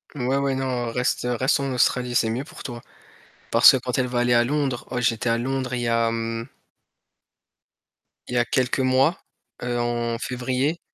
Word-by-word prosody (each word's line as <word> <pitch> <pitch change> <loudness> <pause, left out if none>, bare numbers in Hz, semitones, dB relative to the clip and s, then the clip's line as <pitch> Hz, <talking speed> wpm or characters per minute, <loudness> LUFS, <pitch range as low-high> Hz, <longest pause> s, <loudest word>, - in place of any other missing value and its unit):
Ouais, 130 0 0
ouais, 140 -1 0
non, 125 -3 -2
reste 125 0 -1
reste 135 +3 +2
en 135 -1 -2
Australie, 125 0 +1
c'est 115 -2 +2
mieux 120 +4 -2
pour - - -12
toi, 120 -3 -7 0.7
parce - - +9
que - - +2
quand 125 0 -3
elle 125 - +1
va 125 0 -2
aller 120 0 +2
à 120 - +5
Londres, 135 -1 -1
oh, 125 - -2
j'étais 115 -1 0
à 115 - +2
Londres, 130 +1 -2
il 120 - -2
y 120 - -1
a, 115 0 +2
mmh 115 0 -3 1.8
il 125 - -3
y - - +2
a 120 - +3
quelques 130 +2 0
mois, 130 +5 +2 0.4
heu, 120 0 -1
en 120 -1 -1
février, 130 +6 -2
125 Hz, 190 wpm, -23 LUFS, 120-130 Hz, 1.8 s, parce